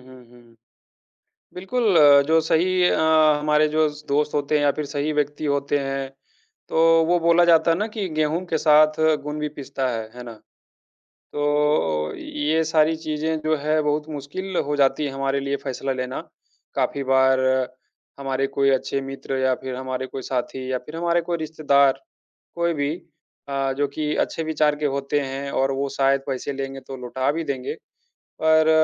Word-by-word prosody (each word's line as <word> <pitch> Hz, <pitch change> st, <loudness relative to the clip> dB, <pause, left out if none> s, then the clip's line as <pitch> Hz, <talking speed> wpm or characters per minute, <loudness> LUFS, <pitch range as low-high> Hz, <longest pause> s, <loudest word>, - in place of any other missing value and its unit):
हुँ, 130 Hz, -1 st, -14 dB
हुँ। 120 Hz, -1 st, -20 dB, 1.0 s
बिल्कुल 195 Hz, +2 st, 0 dB
अ, 145 Hz, -2 st, +8 dB
जो 160 Hz, +1 st, +4 dB
सही 180 Hz, +3 st, +1 dB
अ, -, -, +1 dB, 0.4 s
हमारे 150 Hz, 0 st, +3 dB
जो 155 Hz, 0 st, +2 dB
स 150 Hz, 0 st, -11 dB
दोस्त 150 Hz, +1 st, 0 dB
होते 145 Hz, 0 st, 0 dB
हैं 145 Hz, -, +1 dB
या 145 Hz, -, +4 dB
फिर 150 Hz, -, -4 dB
सही 145 Hz, +1 st, -2 dB
व्यक्ति 150 Hz, 0 st, -2 dB
होते 140 Hz, 0 st, 0 dB
हैं, 135 Hz, -1 st, -3 dB, 0.6 s
तो 165 Hz, 0 st, +4 dB
वो 175 Hz, +1 st, +3 dB
बोला 170 Hz, +1 st, +4 dB
जाता 165 Hz, -1 st, +4 dB
है 165 Hz, -, +3 dB
ना 210 Hz, -, 0 dB
कि 205 Hz, -4 st, -2 dB
गेहूँ 155 Hz, +3 st, 0 dB
के 165 Hz, -2 st, -1 dB
साथ 155 Hz, 0 st, +4 dB, 0.2 s
घुन 150 Hz, +1 st, -6 dB
भी 150 Hz, -, -1 dB
पिसता 135 Hz, -1 st, -3 dB
है, 115 Hz, -3 st, -3 dB
है 125 Hz, -, -7 dB
ना। 120 Hz, -, -8 dB, 1.0 s
तो 145 Hz, -, -2 dB, 0.7 s
ओ -, -, -7 dB
ये 155 Hz, +2 st, -1 dB
सारी 160 Hz, 0 st, +2 dB
चीज़ें 155 Hz, 0 st, -2 dB
जो 155 Hz, 0 st, +2 dB
हैं 155 Hz, +2 st, 0 dB
बहुत 150 Hz, +1 st, 0 dB
मुश्किल 155 Hz, +6 st, -6 dB
हो 145 Hz, +1 st, -1 dB
जाती 145 Hz, +1 st, +2 dB
है 140 Hz, -, -3 dB
हमारे 135 Hz, 0 st, -1 dB
लिए 140 Hz, 0 st, -2 dB
फैसला 135 Hz, 0 st, -3 dB
लेना। 130 Hz, 0 st, -4 dB, 0.6 s
काफ़ी 140 Hz, -, -1 dB
बार 130 Hz, 0 st, +3 dB, 0.8 s
हमारे 135 Hz, 0 st, -1 dB
कोई 140 Hz, 0 st, +1 dB
अच्छे 135 Hz, +1 st, 0 dB
मित्र 135 Hz, 0 st, -5 dB
या 130 Hz, 0 st, +2 dB
फिर 130 Hz, 0 st, -6 dB
हमारे 130 Hz, 0 st, -4 dB
कोई 135 Hz, -, -7 dB
साथी 130 Hz, +1 st, -3 dB
या 130 Hz, -, 0 dB
फिर 150 Hz, +6 st, -11 dB
हमारे 170 Hz, +1 st, +1 dB
कोई 170 Hz, 0 st, -3 dB
रिश्तेदार, 145 Hz, -3 st, +2 dB, 0.5 s
कोई 170 Hz, 0 st, 0 dB
भी 145 Hz, -2 st, -1 dB, 0.6 s
अ, 135 Hz, -1 st, -1 dB
जो 145 Hz, 0 st, +1 dB
कि 150 Hz, +2 st, -3 dB
अच्छे 165 Hz, -, -1 dB
विचार 155 Hz, -1 st, +1 dB
के 150 Hz, -, -3 dB
होते 140 Hz, +1 st, -1 dB
हैं 135 Hz, +1 st, -5 dB
और 135 Hz, +1 st, +1 dB
वो 140 Hz, +1 st, -2 dB
शायद 135 Hz, 0 st, +1 dB
पैसे 135 Hz, +1 st, -3 dB
लेंगे 135 Hz, 0 st, -5 dB
तो 135 Hz, -, -7 dB
लौटा 130 Hz, +2 st, -1 dB
भी 165 Hz, +2 st, -3 dB
देंगे, 135 Hz, -4 st, -4 dB, 0.7 s
पर 160 Hz, 0 st, +4 dB
145 Hz, 180 wpm, -23 LUFS, 135-155 Hz, 1.0 s, अ